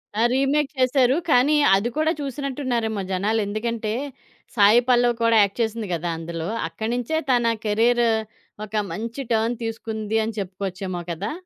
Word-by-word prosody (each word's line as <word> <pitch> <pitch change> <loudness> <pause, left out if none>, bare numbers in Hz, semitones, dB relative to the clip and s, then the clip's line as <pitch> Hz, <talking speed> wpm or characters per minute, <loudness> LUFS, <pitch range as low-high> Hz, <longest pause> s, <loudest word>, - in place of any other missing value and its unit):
ఆ! 220 - 0
రీమేక్ 275 +2 +1
చేసారు, 255 0 +3
కానీ 285 +3 +4 0.2
అది 215 +5 0
కూడా 315 +1 +2
చూసినట్టున్నారేమో 255 -6 -2
జనాలెందుకంటే 215 +3 -1 0.6
సాయి 210 +3 +6
పల్లవి 240 -1 +4
కూడా 230 -1 +4
యాక్ట్ 200 +3 0
చేసింది 225 -1 -2
గదా! 170 +1 -2
అందులో. 165 +1 -5 0.2
అక్కడ్నించే 235 - -2
తన 235 -2 +3
కెరియర్ 235 +3 +3 0.6
ఒక 215 +1 -9 0.2
మంచి 230 +8 -5
టర్న్ 225 +2 +1
తీసుకుంది 220 -1 -3
అని 225 - -4
చెప్పుకోవచ్చేమో 185 -1 -4
కదా! 190 +6 -4
225 Hz, 130 wpm, -23 LUFS, 205-245 Hz, 0.6 s, సాయి